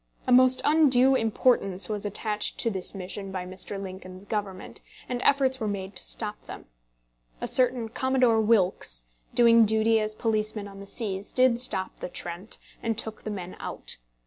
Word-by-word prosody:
A -, -, -1 dB
most 255 Hz, +1 st, +5 dB
undue 270 Hz, -4 st, +5 dB
importance 220 Hz, -5 st, +2 dB
was 210 Hz, -1 st, -3 dB
attached 210 Hz, +1 st, -1 dB
to 230 Hz, -, 0 dB
this 190 Hz, 0 st, 0 dB
mission 195 Hz, +1 st, -6 dB
by 185 Hz, -1 st, -4 dB
Mr. 185 Hz, +2 st, -5 dB
Lincoln's 185 Hz, 0 st, -9 dB
government, 200 Hz, -3 st, -5 dB, 0.3 s
and 245 Hz, -1 st, -3 dB
efforts 265 Hz, -2 st, +2 dB
were 220 Hz, -, -2 dB
made 195 Hz, -1 st, -5 dB
to -, -, -3 dB
stop 215 Hz, -2 st, -3 dB
them. -, -, -10 dB, 0.7 s
A -, -, -3 dB
certain 250 Hz, -2 st, +4 dB
Commodore 250 Hz, -1 st, +2 dB
Wilkes, 190 Hz, -, +1 dB, 0.3 s
doing 230 Hz, -1 st, +6 dB
duty 220 Hz, +1 st, +3 dB
as 215 Hz, 0 st, -3 dB
policeman 215 Hz, -2 st, -1 dB
on 195 Hz, -1 st, -12 dB
the 200 Hz, -, -10 dB
seas, 200 Hz, -3 st, -2 dB
did 255 Hz, -2 st, +3 dB
stop 190 Hz, -6 st, 0 dB
the -, -, -5 dB
"Trent," 175 Hz, +4 st, -6 dB, 0.2 s
and 225 Hz, -2 st, -2 dB
took 220 Hz, -1 st, -4 dB
the -, -, -5 dB
men 185 Hz, -3 st, -6 dB
out. -, -, -4 dB
215 Hz, 170 wpm, -26 LUFS, 195-240 Hz, 0.7 s, doing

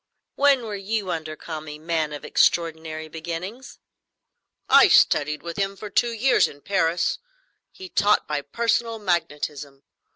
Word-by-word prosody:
"When 280 Hz, -3 st, +3 dB
were 215 Hz, -, -5 dB
you 200 Hz, -1 st, -2 dB
under 155 Hz, -1 st, -4 dB
Kami, 155 Hz, -2 st, -7 dB
man 160 Hz, -1 st, -2 dB
of 145 Hz, -, -7 dB
extraordinary 160 Hz, -2 st, 0 dB
beginnings?" 170 Hz, +10 st, -7 dB, 0.9 s
"I -, -, +7 dB
studied 150 Hz, +1 st, +3 dB
with 170 Hz, -1 st, -6 dB
him 195 Hz, 0 st, -1 dB
for 205 Hz, +1 st, -9 dB
two 235 Hz, +4 st, +2 dB
years 235 Hz, +4 st, +3 dB
in 145 Hz, -, -13 dB
Paris. 170 Hz, -2 st, 0 dB, 0.5 s
He 375 Hz, -, -10 dB
taught 210 Hz, -, +2 dB
by 150 Hz, -1 st, -2 dB
personal 230 Hz, +8 st, -1 dB
magnetism. 150 Hz, -7 st, -3 dB
170 Hz, 135 wpm, -24 LUFS, 155-210 Hz, 0.9 s, I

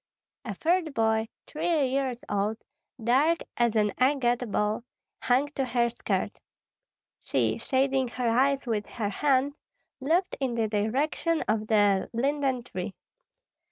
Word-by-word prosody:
A 210 Hz, -4 st, -4 dB
third 330 Hz, -, 0 dB
boy, 220 Hz, 0 st, +2 dB, 0.2 s
three 315 Hz, -1 st, 0 dB
years 265 Hz, -1 st, -1 dB
old, 205 Hz, +2 st, 0 dB, 0.5 s
dark 285 Hz, +8 st, +3 dB
as 235 Hz, -2 st, +2 dB
an 210 Hz, -2 st, +2 dB
agate 250 Hz, -3 st, +2 dB
ball, 210 Hz, +3 st, 0 dB, 0.4 s
hung 260 Hz, +4 st, +2 dB
to 280 Hz, -2 st, -2 dB
her 240 Hz, -1 st, +1 dB
skirt. 235 Hz, -, -2 dB, 0.8 s
She, -, -, 0 dB
shading 265 Hz, -1 st, +1 dB
her 245 Hz, 0 st, -2 dB
eyes 270 Hz, +4 st, +2 dB
with 215 Hz, -4 st, -1 dB
her 215 Hz, -4 st, -3 dB
hand, 275 Hz, +4 st, +1 dB, 0.5 s
looked 330 Hz, +7 st, +1 dB
in 260 Hz, -4 st, -1 dB
the 225 Hz, -2 st, +1 dB
direction 270 Hz, +10 st, 0 dB
of 215 Hz, 0 st, 0 dB
the 205 Hz, -3 st, +3 dB
linden 265 Hz, 0 st, 0 dB
tree. 185 Hz, -4 st, -6 dB
245 Hz, 130 wpm, -27 LUFS, 220-275 Hz, 0.8 s, dark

